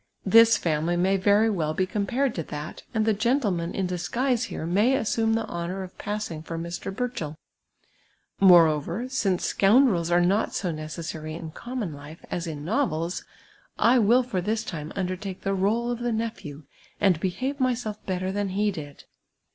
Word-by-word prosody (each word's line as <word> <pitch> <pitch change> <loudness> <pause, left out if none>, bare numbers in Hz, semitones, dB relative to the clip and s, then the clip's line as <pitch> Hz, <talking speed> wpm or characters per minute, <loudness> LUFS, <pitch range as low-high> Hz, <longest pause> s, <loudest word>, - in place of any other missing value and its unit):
This 230 +2 +7
fjimily 165 0 0
may 190 +2 +2
very 205 +3 +4
well 155 -5 -1
be 185 - +1
compared 235 +6 -1
to 165 - -3
that, 150 0 -7
and 220 -2 0
the 220 - +3
<j^entleman 205 -6 0
in 195 - -1
disguise 230 +8 -1
here 160 - -5
may 205 +10 +3
assume 225 -2 +1
the 225 - -1
honour 175 +3 -4
of 185 - -10
passin«jj 205 -7 -4
for 165 - -5
Mr. 170 +3 -5
liurchell; 195 -9 -4 1.0
moreover, 170 - +5
since 200 -9 0
scoundrels 195 -5 +3
are 175 0 +4
not 190 +5 +1
so 180 -4 -1
necessiiiy 155 0 -6
in 165 -2 -7
common 240 -4 -5
life 145 +3 -11
as 170 -1 -3
in 150 -2 -6
novels, 180 - -1 0.5
I 245 +2 +5
will 235 +4 +4
for 225 -7 -2
tliis 220 +4 -1
time 155 -9 -6
undertake 185 0 -4
the 195 - -1
role 220 +5 +1
of 240 - -3
the 240 0 -1
nephew, 215 -10 -4 0.4
and 185 -5 +3
behave 255 - -2
myself 245 -5 -1
iK'tter 185 0 -2
than 205 -1 -1
he 205 +2 +1
did.' 145 -6 -9
195 Hz, 170 wpm, -26 LUFS, 170-225 Hz, 1.0 s, This